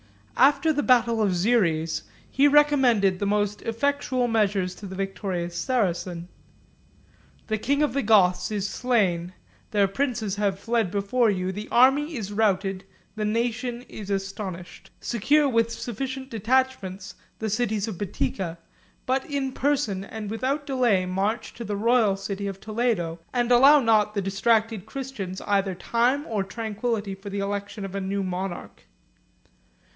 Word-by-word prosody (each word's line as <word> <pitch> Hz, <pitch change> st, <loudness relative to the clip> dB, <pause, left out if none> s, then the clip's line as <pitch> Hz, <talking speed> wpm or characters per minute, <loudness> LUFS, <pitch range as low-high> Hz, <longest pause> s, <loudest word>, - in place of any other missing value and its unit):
After 290 Hz, +4 st, +4 dB
the 290 Hz, -, 0 dB
battle 235 Hz, -4 st, +3 dB
of 200 Hz, -3 st, +2 dB
Xeres 175 Hz, -5 st, +1 dB, 0.3 s
he 280 Hz, +2 st, +3 dB
recommended 265 Hz, -10 st, +4 dB
the 200 Hz, -, -1 dB
most 205 Hz, 0 st, 0 dB
effectual 255 Hz, +1 st, 0 dB
measures 200 Hz, -5 st, +1 dB
to 205 Hz, -, -9 dB
the 190 Hz, -, -7 dB
victorious 190 Hz, -3 st, -3 dB
Saracens. 175 Hz, -4 st, -1 dB, 1.2 s
"The 220 Hz, -1 st, -2 dB
king 280 Hz, +6 st, +1 dB
of 300 Hz, -, 0 dB
the 275 Hz, -, +1 dB
Goths 185 Hz, -5 st, +3 dB
is 205 Hz, -2 st, -2 dB
slain; 190 Hz, -7 st, 0 dB, 0.4 s
their 205 Hz, -3 st, +3 dB
princes 220 Hz, -2 st, -2 dB
are 205 Hz, -1 st, +2 dB
fled 225 Hz, +1 st, -1 dB
before 205 Hz, +5 st, +1 dB
you, 185 Hz, -2 st, -1 dB
the 210 Hz, +3 st, -6 dB
army 275 Hz, +6 st, +4 dB
is 205 Hz, -4 st, -5 dB
routed, 195 Hz, -3 st, 0 dB, 0.3 s
the 215 Hz, -1 st, -2 dB
nation 240 Hz, +2 st, -1 dB
is 210 Hz, -5 st, -9 dB
astonished. 195 Hz, -2 st, -5 dB
Secure 285 Hz, +6 st, +2 dB
with 230 Hz, -3 st, +1 dB
sufficient 265 Hz, +3 st, -5 dB
detachments 225 Hz, -4 st, -1 dB, 0.2 s
the 220 Hz, -, -3 dB
cities 220 Hz, -1 st, 0 dB
of 205 Hz, -6 st, -6 dB
Boetica; 170 Hz, -1 st, -3 dB, 0.5 s
but 265 Hz, +1 st, +1 dB
in 275 Hz, -2 st, -1 dB
person 260 Hz, -9 st, 0 dB
and 210 Hz, 0 st, -7 dB
without 270 Hz, +6 st, -1 dB
delay, 245 Hz, -9 st, +2 dB
march 195 Hz, +5 st, -2 dB
to 235 Hz, -, -7 dB
the 210 Hz, -2 st, -3 dB
royal 225 Hz, -2 st, +3 dB
city 195 Hz, +1 st, -4 dB
of 195 Hz, -1 st, -5 dB
Toledo, 215 Hz, -7 st, -1 dB
and 245 Hz, -1 st, 0 dB
allow 275 Hz, +5 st, +7 dB
not 215 Hz, -4 st, +2 dB
the 200 Hz, -, +1 dB
distracted 215 Hz, +1 st, +1 dB
Christians 220 Hz, -8 st, -6 dB
either 195 Hz, -2 st, 0 dB
time 245 Hz, -, +1 dB
or 210 Hz, -3 st, -1 dB
tranquillity 215 Hz, 0 st, -3 dB
for 195 Hz, +1 st, -9 dB
the 200 Hz, -, -4 dB
election 200 Hz, +1 st, -4 dB
of 195 Hz, -, -7 dB
a 195 Hz, -, -3 dB
new 195 Hz, +1 st, -2 dB
monarch." 185 Hz, 0 st, -5 dB
215 Hz, 150 wpm, -25 LUFS, 195-245 Hz, 1.2 s, allow